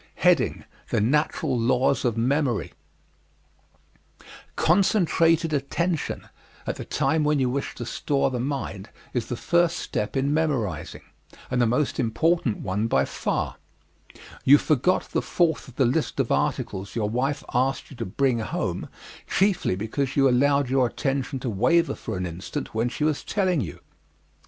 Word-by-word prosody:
The - - +1
Natural 145 +4 +1
Laws 130 +3 +2
of 115 -2 0
Memory 130 0 0 1.8
Concentrated 165 -3 +3
attention 155 +4 -1 0.4
at - - -3
the - - -6
time 160 -1 +1
when 150 0 +2
you 130 -2 +1
wish 140 +2 -3
to 120 - -6
store 135 +2 0
the 125 - -2
mind 120 -7 -4 0.2
is 120 -2 -1
the 120 - -3
first 170 +3 +2
step 105 +6 -3
in 140 +2 +1
memorizing 125 - -1 0.5
and 125 -1 +2
the 120 - +4
most 125 +5 0
important 135 +1 +1
one 100 +4 -1
by - - +2
far. - - -2 0.9
You 140 +2 +8
forgot 155 +5 +2
the - - +1
fourth 170 -3 0
of 125 - -14
the 135 - +3
list 135 +6 0
of - - 0
articles 95 +1 -1
your 110 -3 0
wife 135 +6 -1
asked 135 +3 0
you 135 - -11
to 115 - -3
bring 125 +4 +1
home 110 - -3 0.4
chiefly 190 - +2
because 115 +7 -2
you 135 -1 +5
allowed 140 +2 +3
your 130 0 +2
attention 135 +1 -2
to 125 - -2
waver 125 - +2
for - - -5
an 90 - -2
instant 90 +2 -6
when 115 +2 0
she 150 - -4
was 155 -1 0
telling 185 -7 +1
you. 80 -9 -6
135 Hz, 150 wpm, -25 LUFS, 120-150 Hz, 1.8 s, You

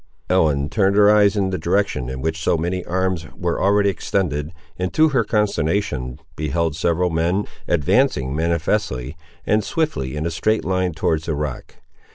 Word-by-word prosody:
Ellen 75 -6 +2
turned 100 +1 +2
her 105 0 +6
eyes 105 0 +4
in 95 -2 +1
the 95 - -2
direction 85 -7 0
in 65 0 -5
which 80 0 -2
so 80 - +2
many 90 +3 -2
arms 95 -2 -1
were 85 -2 -2
already 100 +1 +3
extended, 80 -4 -2 0.3
and, 90 0 -1
to 155 0 +4
her 130 -5 +2
consternation, 100 - -1 0.2
beheld 75 +2 -1
several 85 +2 +1
men, 85 +5 0 0.2
advancing 75 - +1
manifestly 80 - -1 0.3
and 105 0 +2
swiftly 100 - -2
in 75 +2 -3
a 85 - -1
straight 110 +8 0
line 95 -1 0
towards 80 +1 -1
the 80 - 0
rock. 75 -3 -5
85 Hz, 165 wpm, -21 LUFS, 75-100 Hz, 0.3 s, her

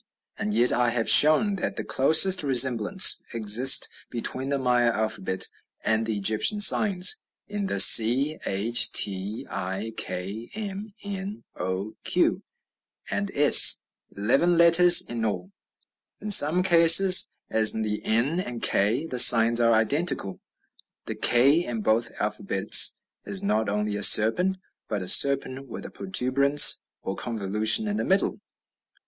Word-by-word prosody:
And 105 - -6
yet 120 +4 -1
I 120 -1 -2
have 115 -1 -5
shown 195 +7 +3
that - - -7
the - - -8
closest 160 +7 +1
resemblances 130 - +2
exist 115 +4 +4 0.2
between 130 +3 -6
the 140 - -4
Maya 125 -2 -2
alphabet 110 -4 -5 0.4
and 110 0 -3
the 110 -2 -6
Egyptian 110 - -2
signs 200 - +3 0.3
in 205 -1 -7
the - - -6
c, 130 +7 +4
h, 105 +5 0
t, 100 +2 -3
i, 95 +5 -8
k, 100 +6 -6
m, 205 0 -10
n, 200 +1 -10
o, 95 +4 -8
q, - - -2 0.7
and 200 0 -5
s 145 0 +5 0.4
eleven 135 - -2
letters 170 +1 +5
in 115 -1 -8
all; 95 -3 -7 0.7
in 210 0 -9
some 180 0 +4
cases, 175 +1 +4 0.2
as 110 -1 +2
in 110 - -6
the 105 -1 -7
n 125 +10 -3
and 120 -9 -9
k, 110 +10 -2
the 130 -6 -5
signs 115 0 +5
are 115 0 0
identical; 110 - -4 0.7
the - - -8
k, 140 +8 +1
in 115 -8 -7
both 115 +2 -1
alphabets, - - +1 0.3
is 100 -2 -2
not 105 +1 -4
only 105 0 -5
a - - -8
serpent, 180 - +3 0.3
but 105 -4 -6
a - - -9
serpent 135 +1 +2
with 115 - -12
a - - -12
protuberance 140 -4 +1 0.2
or 95 - -8
convolution 110 - 0
in 210 0 -6
the - - -5
middle! 195 +2 -3
120 Hz, 140 wpm, -21 LUFS, 110-170 Hz, 0.7 s, s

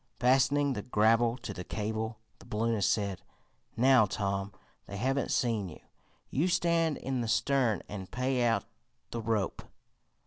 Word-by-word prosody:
Fastening 135 +3 +3
the 105 - -3
grapple 115 +2 +3
to 105 - -6
the 90 - -6
cable, 110 +3 -3 0.2
the - - -15
balloonist 110 -1 0
said: 100 -3 -1 0.6
"Now, 125 -2 +5
Tom, 100 0 -2 0.4
they 100 - -6
haven't 135 +5 0
seen 110 -6 0
you. 75 - -11 0.5
You 155 +7 +1
stand 170 -3 +2
in 130 -1 -2
the 115 - -2
stern 120 0 +1
and 95 -2 -7
pay 125 0 0
out 115 -4 +2 0.5
the 115 - -3
rope. 110 -4 -1
115 Hz, 145 wpm, -30 LUFS, 105-130 Hz, 0.6 s, Now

